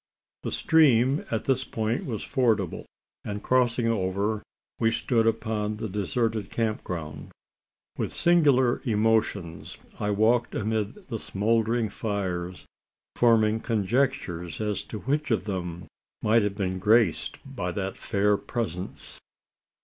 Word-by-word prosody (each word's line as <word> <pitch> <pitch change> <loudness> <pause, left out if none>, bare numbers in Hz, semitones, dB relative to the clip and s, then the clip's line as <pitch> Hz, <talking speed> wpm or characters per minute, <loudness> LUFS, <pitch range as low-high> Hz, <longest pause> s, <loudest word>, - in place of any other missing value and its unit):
The - - -3
stream 140 -3 +4
at 110 - -1
this 130 -1 +1
point 110 -1 -2
was 110 -6 -3
fordable; 115 - 0 0.4
and 105 0 -5
crossing 125 -2 +2
over, 100 0 0 0.4
we 115 - +3
stood 115 0 +1
upon 110 -1 -1
the 110 +1 -4
deserted 105 +1 -1
camp 110 -2 -1
ground. 75 -4 -6 0.7
With - - -1
singular 145 -8 +4
emotions, 105 - 0 0.2
I 105 - -1
walked 115 +4 +2
amid 110 0 -1
the 115 - -3
smouldering 115 +3 +1
fires 95 -4 -3 0.5
forming 110 -2 +4
conjectures 100 - -1
as 105 -2 -1
to 105 - -7
which 145 +3 -1
of 110 -6 +1
them 90 -4 -4 0.4
might 115 +2 +4
have 105 -1 -1
been 95 -2 -2
graced 105 -2 +3
by - - -4
that - - -3
fair 100 +1 +1
presence. 95 -7 -5
110 Hz, 125 wpm, -27 LUFS, 100-120 Hz, 0.7 s, stream